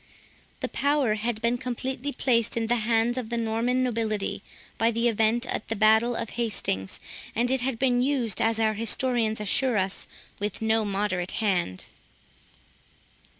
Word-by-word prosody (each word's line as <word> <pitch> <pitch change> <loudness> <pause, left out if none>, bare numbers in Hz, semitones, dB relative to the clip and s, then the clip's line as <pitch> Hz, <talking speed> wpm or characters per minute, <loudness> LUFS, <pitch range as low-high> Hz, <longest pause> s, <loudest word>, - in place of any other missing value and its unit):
The - - 0
power 280 -5 +1
had 220 +1 -3
been 240 +1 +1
completely 260 +3 -3
placed 235 -5 +1
in 230 - +1
the 240 +2 +2
hands 230 +2 +1
of 230 -3 -6
the 235 - -2
Norman 230 +3 +1
nobility, 220 -4 -1 0.4
by 225 - +4
the 230 +1 +1
event 225 +2 +2
of - - -2
the 225 - -2
battle 220 +3 +4
of 230 -2 -3
Hastings, 195 - -2 0.4
and 245 +2 +1
it 265 -1 +1
had 255 -2 -1
been 245 -1 +2
used, 250 -6 +1
as 225 0 +2
our 220 -1 +2
histories 230 0 0
assure 225 +3 +1
us, 190 0 -2 0.3
with 205 -1 -3
no 220 0 +2
moderate 195 -3 -1
hand. 180 - 0
230 Hz, 155 wpm, -26 LUFS, 215-245 Hz, 0.4 s, by